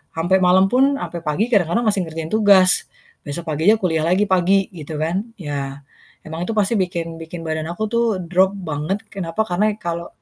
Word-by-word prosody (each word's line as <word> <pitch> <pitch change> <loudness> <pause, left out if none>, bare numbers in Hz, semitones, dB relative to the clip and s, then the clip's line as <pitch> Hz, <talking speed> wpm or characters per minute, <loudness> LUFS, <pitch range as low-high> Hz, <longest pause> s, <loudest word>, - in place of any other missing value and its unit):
sampai 175 +4 +2
malam 185 +2 +5
pun, 270 +3 +3
sampai 175 - -5
pagi, 170 +8 0
kadang-kadang 205 +2 +2
masih 205 -2 +2
ngerjain 160 0 -6
tugas. 200 -4 +5 0.4
Besok 170 +4 -5
pagi 160 +5 -1
aja 220 - +6
kuliah 160 -4 0
lagi 185 +4 +3
pagi 190 +1 +3
gitu 155 -3 -8
kan. 180 +8 -1
Ya, 140 -4 -5 0.4
emang 160 +2 -5
itu 225 - -2
pasti 210 +1 +2
bikin 170 -3 -3
bikin 165 +1 -8
badan 160 0 -3
aku 195 +5 -4
tuh 235 0 +2 0.2
drop 190 +2 +3
banget 165 +2 -3
kenapa 190 +2 -2
karena 205 +4 +1
ya - - -10
kalau 170 0 -4
175 Hz, 190 wpm, -20 LUFS, 160-195 Hz, 0.4 s, aja